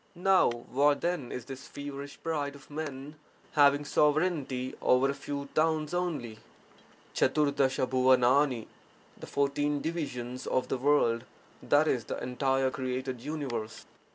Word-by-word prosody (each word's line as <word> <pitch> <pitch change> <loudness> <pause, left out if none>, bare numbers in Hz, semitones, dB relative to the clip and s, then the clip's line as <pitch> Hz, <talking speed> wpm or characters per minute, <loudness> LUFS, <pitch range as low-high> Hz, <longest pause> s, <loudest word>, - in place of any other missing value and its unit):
For 190 +1 +5
what 135 +5 +1
then 170 -8 -2
is 125 - -5
this 130 0 -9
feverish 145 0 -7
pride 145 -3 -2
of 140 +1 -16
men 145 -1 -6 0.3
having 145 0 +4
sovereignty 145 -5 +1
over 130 +2 +3
a - - -3
few 140 0 -5
towns 155 0 +1
only? 155 -12 -2 0.7
pcj^Tl 145 +2 +2
^MlPl 130 -1 +3 0.3
— - - -28
The - - -9
fourteen 145 +1 0
divisions 130 -6 -4
of 130 - 0
the 130 - -1
world, 125 -4 +2 0.4
that 145 +2 +3
is, 125 -6 0
the - - -4
entire 135 +1 0
created 130 -1 -3
universe. 130 -7 -5
140 Hz, 130 wpm, -30 LUFS, 130-150 Hz, 0.7 s, For